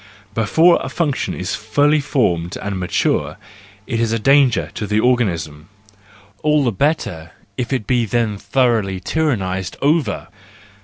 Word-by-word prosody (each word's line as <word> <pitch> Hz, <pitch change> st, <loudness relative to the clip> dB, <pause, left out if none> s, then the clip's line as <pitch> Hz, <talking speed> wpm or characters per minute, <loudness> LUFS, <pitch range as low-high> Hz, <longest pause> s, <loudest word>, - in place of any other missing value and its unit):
Before 160 Hz, +11 st, +4 dB
a -, -, -4 dB
function 150 Hz, -5 st, -1 dB
is 90 Hz, -, -4 dB
fully 145 Hz, +8 st, +2 dB
formed 90 Hz, -, 0 dB
and 100 Hz, -2 st, -4 dB
matured, 90 Hz, -1 st, 0 dB, 0.5 s
it 115 Hz, -3 st, -2 dB
is 115 Hz, -1 st, +1 dB
a 115 Hz, -, +1 dB
danger 135 Hz, 0 st, +3 dB
to 105 Hz, -, -4 dB
the 105 Hz, +1 st, +1 dB
organism: 90 Hz, -12 st, 0 dB, 0.7 s
all 150 Hz, -1 st, +2 dB
the 120 Hz, -, +1 dB
better 95 Hz, -, -2 dB, 0.2 s
if 120 Hz, +2 st, -3 dB
it 130 Hz, -6 st, -1 dB
be 125 Hz, -3 st, +1 dB
then 110 Hz, -3 st, -1 dB
thoroughly 110 Hz, -3 st, +1 dB
tyrannised 95 Hz, -, -2 dB
over! 150 Hz, -6 st, 0 dB
115 Hz, 140 wpm, -19 LUFS, 95-140 Hz, 0.7 s, Before